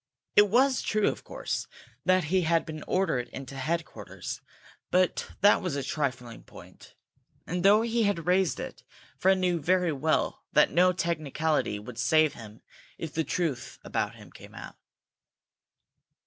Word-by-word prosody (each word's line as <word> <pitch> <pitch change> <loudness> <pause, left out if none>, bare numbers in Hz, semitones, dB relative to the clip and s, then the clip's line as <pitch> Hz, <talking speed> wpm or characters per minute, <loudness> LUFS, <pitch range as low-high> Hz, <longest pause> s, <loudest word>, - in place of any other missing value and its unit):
It 205 - +7
was 255 +4 +3
true, 215 -1 +1
of - - -6
course, - - -4 0.4
that 185 0 +4
he 190 - +4
had 165 0 +2
been 155 -1 -7
ordered 180 -10 0
into 135 0 -8
headquarters, 160 +5 -4 0.5
but 185 0 +1
that 205 +1 +6
was 180 -7 -2
a 140 - -2
trifling 130 -4 -3
point, - - -15 0.5
and, 180 +2 -2
though 205 +3 +6
he 235 0 0
had 200 -6 0
raised 180 -1 +2
it, - - -7 0.4
Fred 190 +1 +4
knew 180 -3 0
very 180 +2 +2
well 155 +2 0
that 150 - +5
no 180 +2 +5
technicality 155 - -1
would 110 +3 -9
save 155 +6 +3
him 110 -1 -12 0.3
if 160 -3 -6
the 160 - 0
truth 150 -4 -3
about - - -2
him - - -14
came - - -14
out. - - -10
165 Hz, 150 wpm, -28 LUFS, 140-185 Hz, 0.5 s, It